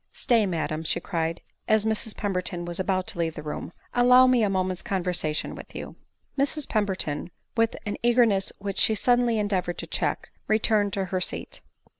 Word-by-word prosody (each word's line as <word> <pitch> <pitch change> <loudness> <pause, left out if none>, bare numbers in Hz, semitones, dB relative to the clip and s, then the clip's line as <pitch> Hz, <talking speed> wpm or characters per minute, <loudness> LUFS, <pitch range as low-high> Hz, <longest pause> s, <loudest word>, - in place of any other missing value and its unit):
" - - -47
Stay, 230 -4 +4
madam," 160 -3 -2
she - - +1
cried, 165 -1 -2 0.3
as 215 -1 +3
Mrs 220 0 -1
Pemberton 180 -3 -2
was 175 +1 -5
about 185 -1 0
to - - -3
leave 165 -1 -1
the 150 - -7
room, 150 +2 -5
" - - -34
allow 250 +1 +7
me 255 -2 +4
a 210 - +2
moment's 185 -1 -1
conver 185 -2 -1
sation 155 -3 -1
with - - -11
you." - - -7 0.4
Mrs 285 +1 +1
Pemberton, 190 -8 -1 0.3
with 225 -1 +2
an 205 - -3
eagerness 235 -5 +3
whieh 200 -1 -4
she 220 - +4
suddenly 245 0 +3
endeavored 190 -4 -1
to - - -5
check, - - -2 0.2
returned 215 -1 +2
to 195 -1 -1
her 185 0 -2
seat. - - -4
195 Hz, 190 wpm, -26 LUFS, 175-220 Hz, 0.4 s, allow